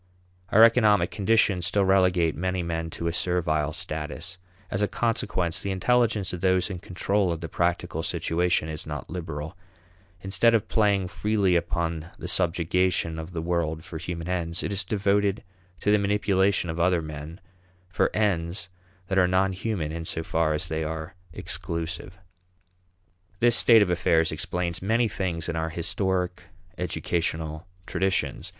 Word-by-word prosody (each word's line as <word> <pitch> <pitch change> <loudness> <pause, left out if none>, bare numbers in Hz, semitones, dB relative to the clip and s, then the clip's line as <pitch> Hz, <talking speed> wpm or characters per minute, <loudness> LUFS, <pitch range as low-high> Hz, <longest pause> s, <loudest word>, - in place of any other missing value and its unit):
Our 110 - +7
economic 115 -3 +5
conditions 100 -4 +2
still 100 -1 +2
relegate 90 -3 +3
many 90 +1 -1
men 80 -1 -3
to 85 - -6
a 85 - 0
servile 80 -4 0
status. 80 +1 -5 0.3
As 95 - -1
a 105 - +3
consequence, 95 -8 0
the 100 - -3
intelligence 105 0 +1
of 90 - -5
those 95 +1 +2
in 90 - -5
control 95 +1 0
of 85 - -3
the 85 - -4
practical 85 -1 -1
situation 85 0 0
is 80 -1 -5
not 75 0 -6
liberal. 80 -2 -5 0.7
Instead 95 +5 +3
of 110 -1 0
playing 100 -4 +2
freely 100 -1 +1
upon 85 -1 -1
the - - -6
subjugation 90 -1 0
of 80 +3 -7
the 80 -2 -4
world 80 -2 -1
for 80 - -7
human 85 0 -5
ends, 85 -1 -2
it - - -2
is 100 0 -1
devoted 100 +1 +1 0.4
to 105 - +2
the 105 - +5
manipulation 100 -3 +1
of 80 - -6
other 85 -1 +2
men 75 +3 -8 0.5
for 90 - +1
ends 90 -3 0 0.4
that 95 +1 +1
are 90 - +5
non 95 +1 +2
human 95 -5 -3
in 80 0 -5
so 80 - -3
far 80 -1 +1
as 85 +3 -1
they 80 -1 -2
are 80 0 -5 0.2
exclusive. 85 +3 -4 1.2
This 120 -1 +5
state 115 -3 +7
of 90 - -1
affairs 80 -2 +2
explains 90 -1 -2
many 115 +5 +2
things 90 -5 -2
in 85 - -2
our 80 0 -1
historic 90 +1 -2 0.3
educational 80 -2 -2 0.2
traditions. 95 0 -1
90 Hz, 155 wpm, -26 LUFS, 80-95 Hz, 1.2 s, Our